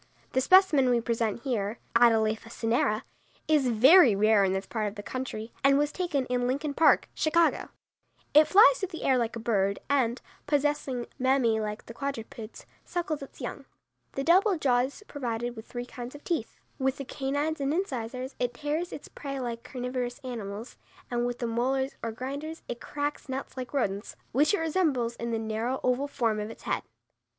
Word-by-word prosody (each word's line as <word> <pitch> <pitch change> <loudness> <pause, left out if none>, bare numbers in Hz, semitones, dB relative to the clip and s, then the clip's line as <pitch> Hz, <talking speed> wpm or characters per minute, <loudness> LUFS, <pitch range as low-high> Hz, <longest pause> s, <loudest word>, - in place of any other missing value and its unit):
The 260 - +2
specimen 315 -6 +5
we 240 -1 +3
present 230 -1 -1
here 225 -5 -1 0.2
(Atalapha 225 -1 +3
cinerea) 225 -2 0 0.4
is 300 -4 +3
very 250 - +7
rare 215 0 +4
in 190 - +2
this 190 +1 -2
part 215 +1 -2
of 205 - -6
the 205 - -7
country, 240 -3 -5
and 275 0 +5
was 295 +1 +1
taken 310 -7 -1
in 245 0 0
Lincoln 285 +3 -1
Park, 320 - +4
Chicago. 330 +1 +2 0.6
It 305 +1 +7
flies 440 +6 +7
through 385 - -1
the 330 - -7
air 260 -2 +3
like 235 -1 -1
a - - -4
bird 200 -3 +1
and, 255 -3 +2 0.3
possessing 290 -4 0
mammæ 255 -4 +2
like 210 0 -4
the 230 - -9
quadrupeds, 235 -4 -6 0.2
suckles 330 -4 -3
its 275 - -11
young. - - -5 0.5
The 275 - -2
double 370 +4 +4
jaw 255 -5 +3
is 265 +11 -3
provided 240 -3 -3
with 220 0 -10
three 245 0 -5
kinds 245 +1 -8
of 290 - -12
teeth. 325 -11 -3 0.2
With 265 0 0
the 275 - -6
canines 285 +4 -2
and 275 0 0
incisors 260 -6 -3
it 245 -1 -1
tears 310 +4 -2
its - - -8
prey 275 -1 -6
like 235 -2 -4
carnivorous 250 -1 -4
animals, 225 -2 -6 0.3
and 240 0 0
with 245 0 -3
the 240 - -3
molars 260 +4 0
or 230 - -3
grinders 280 +7 -6
it 240 -1 -5
cracks 290 -1 -4
nuts 265 +1 -5
like 255 -2 -6
rodents, 205 -7 -2 0.2
which 295 - +3
it - - -3
resembles 300 -8 +1
in 235 - -4
the 230 - 0
narrow, 225 +4 -2
oval 255 +3 +1
form 230 -6 0
of 210 +1 -4
its - - -11
head. - - -1
255 Hz, 185 wpm, -28 LUFS, 230-285 Hz, 0.6 s, very